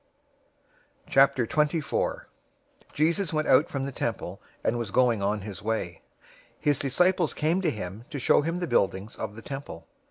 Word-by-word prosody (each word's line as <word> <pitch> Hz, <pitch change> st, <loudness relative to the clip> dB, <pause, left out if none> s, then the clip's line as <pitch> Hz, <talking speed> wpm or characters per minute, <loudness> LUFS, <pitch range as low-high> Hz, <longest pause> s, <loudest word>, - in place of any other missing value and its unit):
'"{Psalm 135 Hz, 0 st, +7 dB
118:26} 150 Hz, +6 st, +1 dB
024:001 140 Hz, -, -1 dB, 0.7 s
Jesus 165 Hz, +4 st, +1 dB
went 155 Hz, -1 st, 0 dB
out 145 Hz, +6 st, +5 dB
from 135 Hz, -1 st, -3 dB
the 140 Hz, -, -3 dB
temple, -, -, -4 dB, 0.2 s
and 120 Hz, -, 0 dB
was 115 Hz, -4 st, -3 dB
going 120 Hz, -1 st, +3 dB
on 105 Hz, +1 st, 0 dB
his 100 Hz, -1 st, -7 dB
way. 105 Hz, -6 st, -3 dB, 0.6 s
His 145 Hz, -1 st, +1 dB
disciples 175 Hz, +5 st, +2 dB
came 165 Hz, +5 st, +1 dB
to 175 Hz, -, +2 dB
him 105 Hz, -2 st, -6 dB
to 155 Hz, -, -5 dB
show 130 Hz, -, +4 dB
him 165 Hz, +4 st, -2 dB
the 180 Hz, -, -2 dB
buildings 100 Hz, 0 st, 0 dB
of 105 Hz, -1 st, -5 dB
the 110 Hz, -, -10 dB
temple. 135 Hz, -, -7 dB
135 Hz, 165 wpm, -27 LUFS, 110-155 Hz, 0.7 s, Psalm